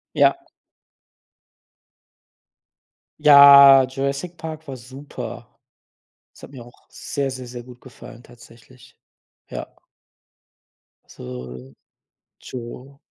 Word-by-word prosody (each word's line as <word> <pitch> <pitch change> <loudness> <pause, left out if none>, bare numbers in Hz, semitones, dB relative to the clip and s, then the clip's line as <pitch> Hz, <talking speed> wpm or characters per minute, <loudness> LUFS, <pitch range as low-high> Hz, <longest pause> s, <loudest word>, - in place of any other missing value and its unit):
Ja. - - +3 2.8
Ja, 140 -2 +8
Jurassic 140 +6 -5
Park 160 -1 -9
war 135 -1 -8
super. 130 +4 -11 0.7
Es - - -21
hat - - -12
mir 130 -4 -12
auch 120 - -21
sehr, 140 -1 -5
sehr, 130 -1 -9
sehr 120 0 -10
gut 125 0 -16
gefallen, 120 -2 -15
tatsächlich. 120 +1 -20 0.5
Ja. - - -9 1.3
So, 65 +1 -11 0.7
tschau. 130 +3 -11
130 Hz, 85 wpm, -20 LUFS, 120-140 Hz, 2.8 s, Ja